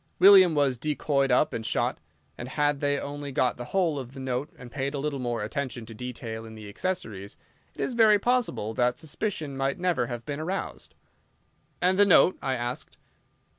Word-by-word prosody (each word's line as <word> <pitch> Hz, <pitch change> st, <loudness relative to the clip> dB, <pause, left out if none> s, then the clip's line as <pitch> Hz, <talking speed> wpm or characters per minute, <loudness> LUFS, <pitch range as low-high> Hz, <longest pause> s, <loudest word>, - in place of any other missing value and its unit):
William 185 Hz, -3 st, +8 dB
was 135 Hz, -4 st, +2 dB
decoyed 140 Hz, -1 st, 0 dB
up 125 Hz, +5 st, +3 dB
and 115 Hz, -, -3 dB
shot, -, -, -1 dB, 0.4 s
and 120 Hz, -, -7 dB
had 145 Hz, +1 st, +1 dB
they 145 Hz, 0 st, +1 dB
only 145 Hz, 0 st, -6 dB
got 130 Hz, -1 st, +1 dB
the 120 Hz, -, -6 dB
whole 170 Hz, -3 st, 0 dB
of 130 Hz, +1 st, -9 dB
the -, -, -7 dB
note 130 Hz, +1 st, -2 dB
and 125 Hz, -1 st, -11 dB
paid 140 Hz, +2 st, -3 dB
a -, -, -2 dB
little 140 Hz, 0 st, -2 dB
more 120 Hz, -3 st, -2 dB
attention 120 Hz, +1 st, -4 dB
to 115 Hz, -, -10 dB
detail 115 Hz, -1 st, -6 dB
in 110 Hz, -1 st, -10 dB
the 105 Hz, -1 st, -10 dB
accessories, 105 Hz, -, -4 dB, 0.4 s
it -, -, -6 dB
is 260 Hz, -, -1 dB
very 220 Hz, -3 st, +6 dB
possible 230 Hz, -, 0 dB
that 125 Hz, +2 st, +1 dB
suspicion 160 Hz, -2 st, -3 dB
might 135 Hz, +1 st, -1 dB
never 175 Hz, -9 st, 0 dB
have 120 Hz, -1 st, -6 dB
been 145 Hz, -1 st, -4 dB
aroused." 180 Hz, +5 st, -4 dB, 0.9 s
"And 185 Hz, +2 st, +3 dB
the 205 Hz, -, +7 dB
note?" 185 Hz, -1 st, +6 dB
I 130 Hz, -, -1 dB
asked. 120 Hz, +1 st, -5 dB
140 Hz, 190 wpm, -27 LUFS, 120-160 Hz, 0.9 s, William